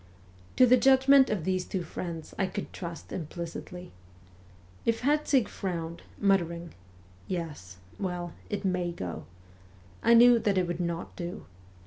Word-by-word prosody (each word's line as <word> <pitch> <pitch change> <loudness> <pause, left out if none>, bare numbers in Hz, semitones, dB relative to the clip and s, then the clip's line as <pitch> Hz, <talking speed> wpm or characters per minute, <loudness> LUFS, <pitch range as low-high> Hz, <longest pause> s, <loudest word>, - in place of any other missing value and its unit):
To 255 - +7
the 250 +1 +6
judgment 265 +1 +6
of 210 -6 -1
these 185 +1 0
two 185 -1 -3
friends 165 0 -6
I 195 - +2
could 185 - -6
trust 170 -2 -7
implicitly. 170 +2 -6 0.9
If 230 0 0
Herzig 280 -4 +2
frowned, 170 -3 -4 0.2
muttering, 170 -4 +1 0.3
' 90 +1 -27
Yes 145 - -7 0.2
well 180 -3 -3 0.2
it 205 -1 -3
may 180 -2 0
go,' 90 - -6 0.8
I 235 +1 +5
knew 240 0 +8
that 205 -3 +1
it 185 - +3
would 175 0 -4
not 170 -1 -4
do. 175 0 -6
180 Hz, 140 wpm, -29 LUFS, 170-220 Hz, 0.9 s, knew